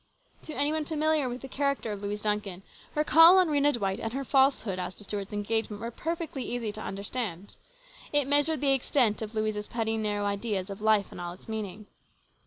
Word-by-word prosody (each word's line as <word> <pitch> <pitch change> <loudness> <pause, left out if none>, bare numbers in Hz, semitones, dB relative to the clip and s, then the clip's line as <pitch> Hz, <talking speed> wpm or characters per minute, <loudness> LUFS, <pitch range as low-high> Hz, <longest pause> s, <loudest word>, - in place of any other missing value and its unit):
To 310 - -6
any 285 +2 +2
one 315 -1 -1
familiar 310 -3 +1
with 245 +1 -6
the 270 - -7
character 280 -4 -1
of 205 -1 -5
Louise 205 +1 -4
Duncan 210 -3 -2 0.3
her 300 - +2
call 330 +4 +8
on 365 -3 +4
Rhena 290 -1 +3
Dwight 195 -4 -1
and 225 0 -4
her 275 +1 -3
falsehood 265 -8 +2
as 180 +1 -4
to - - -11
Stuart's 200 0 -4
engagement 210 0 -1
were 230 +2 -5
perfectly 325 -1 -4
easy 235 -3 -3
to 215 +1 -9
understand. 200 -2 -4 0.6
It 290 -2 +3
measured 290 +2 +3
the 275 -1 +4
extent 250 -4 +2
of 220 0 -6
Louise's 215 -1 -1
petty, 225 -1 -1
narrow 205 -1 -1
ideas 200 -1 -2
of 195 - -8
life 215 -2 +3
and - - -8
all 175 0 -5
its 180 - -17
meaning. 215 -2 -5
220 Hz, 200 wpm, -28 LUFS, 205-280 Hz, 0.6 s, call